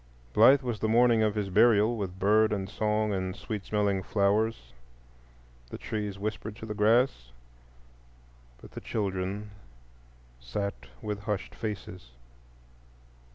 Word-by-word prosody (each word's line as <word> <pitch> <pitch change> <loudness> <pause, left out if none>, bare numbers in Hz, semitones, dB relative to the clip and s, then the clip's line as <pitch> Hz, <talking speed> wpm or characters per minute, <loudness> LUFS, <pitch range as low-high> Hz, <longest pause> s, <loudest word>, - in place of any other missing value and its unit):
Blithe 130 +5 +6
was 120 -4 -3
the 110 - 0
morning 115 0 +4
of 110 -1 +1
his 100 -2 -2
burial, 110 +2 +4
with 95 -4 -5
bird 105 +3 +3
and 100 -2 -2
song 105 0 0
and 95 -1 -3
sweet 105 -3 -5
smelling 100 -2 0
flowers. 100 - 0 1.0
The - - -7
trees 105 -2 -4
whispered 110 +1 -4
to 110 - -9
the 105 - -4
grass, 105 - +2 1.3
but - - -14
the - - -8
children 100 0 -3 0.9
sat 100 -1 -3 0.3
with 105 -1 -3
hushed 105 -2 -4
faces. 95 - -7
105 Hz, 125 wpm, -28 LUFS, 100-110 Hz, 1.3 s, Blithe